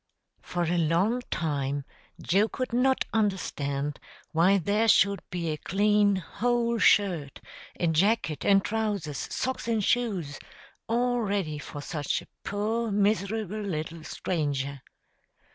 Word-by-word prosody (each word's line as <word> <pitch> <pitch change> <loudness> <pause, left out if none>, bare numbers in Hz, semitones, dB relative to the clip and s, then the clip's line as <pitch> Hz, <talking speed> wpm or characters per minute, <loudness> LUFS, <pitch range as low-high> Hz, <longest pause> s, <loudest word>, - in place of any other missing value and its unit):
For 175 -1 -2
a 170 +1 +1
long 175 +10 +2
time 140 -3 -2 0.3
Joe 200 +5 +2
could 255 -2 -4
not 260 +2 +2
understand 150 -9 -1 0.3
why 180 +5 +4
there 205 +5 +1
should 200 -2 +4
be 170 -2 -3
a 155 - -3
clean, 205 +3 +2
whole 235 +5 0
shirt, 175 -12 +3 0.4
a 175 - +1
jacket 165 0 +1
and 195 -1 +4
trousers, 205 -9 -2
socks 260 -2 -2
and 225 -3 +1
shoes, 190 - 0 0.5
all 245 +1 +1
ready 195 -8 -1
for 145 0 -8
such 150 -2 -2
a - - -20 0.2
poor 220 +3 -1
miserable 210 0 0
little 165 -4 -4
stranger. 140 -6 -2
195 Hz, 125 wpm, -27 LUFS, 160-220 Hz, 0.5 s, why